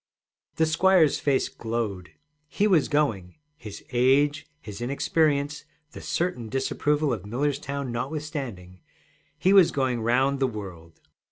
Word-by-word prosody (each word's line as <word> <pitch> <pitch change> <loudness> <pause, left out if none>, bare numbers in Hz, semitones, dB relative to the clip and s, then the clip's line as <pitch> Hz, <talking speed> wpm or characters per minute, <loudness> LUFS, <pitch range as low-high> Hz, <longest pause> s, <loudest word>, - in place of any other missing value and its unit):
The 160 - +2
squire's 165 -1 +3
face 140 -2 +1
glowed. 110 -6 -4 0.4
He 200 - 0
was 180 -8 +3
going 115 -12 -1 0.2
his 110 -8 -10
age, 140 +4 +2
his 105 -4 -9
inexperience, 145 +3 0 0.3
the - - -10
certain 170 -11 -2
disapproval 145 +3 0
of 105 -6 -5
Millerstown 140 +3 -3
notwithstanding 130 - -5 0.6
he 190 - +3
was 190 -4 +7
going 130 -4 -1
round 130 +4 +1
the 135 - +2
world! 90 -8 -9
135 Hz, 120 wpm, -25 LUFS, 115-150 Hz, 0.6 s, was